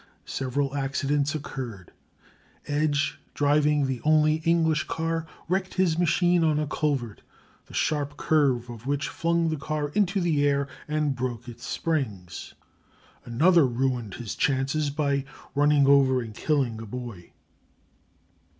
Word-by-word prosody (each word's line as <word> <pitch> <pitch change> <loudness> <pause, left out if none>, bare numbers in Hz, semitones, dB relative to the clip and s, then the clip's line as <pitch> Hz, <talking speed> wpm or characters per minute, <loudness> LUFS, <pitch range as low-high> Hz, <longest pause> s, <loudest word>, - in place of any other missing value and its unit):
Several 135 +1 -2
accidents 145 +2 0
occurred. 120 - -6 0.7
Edge, 145 0 0 0.2
driving 145 0 +3
the 130 -2 -3
only 155 0 +4
English 160 -2 +2
car, 165 0 -2 0.2
wrecked 185 +2 -1
his 175 -3 +2
machine 175 0 +3
on 155 -2 +3
a 150 - 0
culvert, 140 -7 -2 0.5
the - - -11
sharp 145 -1 0
curve 135 -6 +2
of 120 +1 -9
which 140 0 0
flung 170 0 0
the 155 - -1
car 150 0 -2
into 195 +3 +1
the 160 -5 +1
air 140 -1 +2 0.2
and 150 -2 0
broke 120 -1 -4
its 120 0 -9
springs. 110 - -3 0.7
Another 155 +6 +4
ruined 120 -4 -1
his 120 -4 -5
chances 140 +2 0
by 140 -1 0 0.3
running 145 0 +4
over 135 -2 +5
and 115 -3 -6
killing 125 -4 0
a 115 - -8
boy. 115 -6 -8
145 Hz, 130 wpm, -26 LUFS, 130-155 Hz, 0.7 s, over